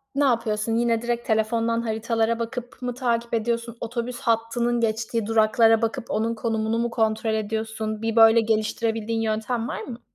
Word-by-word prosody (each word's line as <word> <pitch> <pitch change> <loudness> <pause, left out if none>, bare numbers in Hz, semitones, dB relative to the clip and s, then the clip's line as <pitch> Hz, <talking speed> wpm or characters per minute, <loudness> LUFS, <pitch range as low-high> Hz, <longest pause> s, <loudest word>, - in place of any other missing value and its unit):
ne 285 - +2
yapıyorsun? 225 -4 +1
Yine, 230 -1 +1
direkt 240 0 -2
telefondan 230 +1 +1
haritalara 225 0 0
bakıp 245 +2 -6
mı 250 0 -2
takip 235 -2 -1
ediyorsun? 235 +1 -1
Otobüs 240 +1 -4
hattının 235 +1 0
geçtiği 225 0 -1
duraklara 225 0 +4
bakıp 225 0 -2
onun 225 +2 0
konumunu 225 0 -1
mu 235 0 0
kontrol 220 -1 0
ediyorsun? 220 0 -3
Bir 225 0 -1
böyle 225 0 +7
geliştirebildiğin 225 0 -1
yöntem 225 +2 -1
var - - -4
mı? 240 -2 -8
230 Hz, 155 wpm, -24 LUFS, 220-235 Hz, -, böyle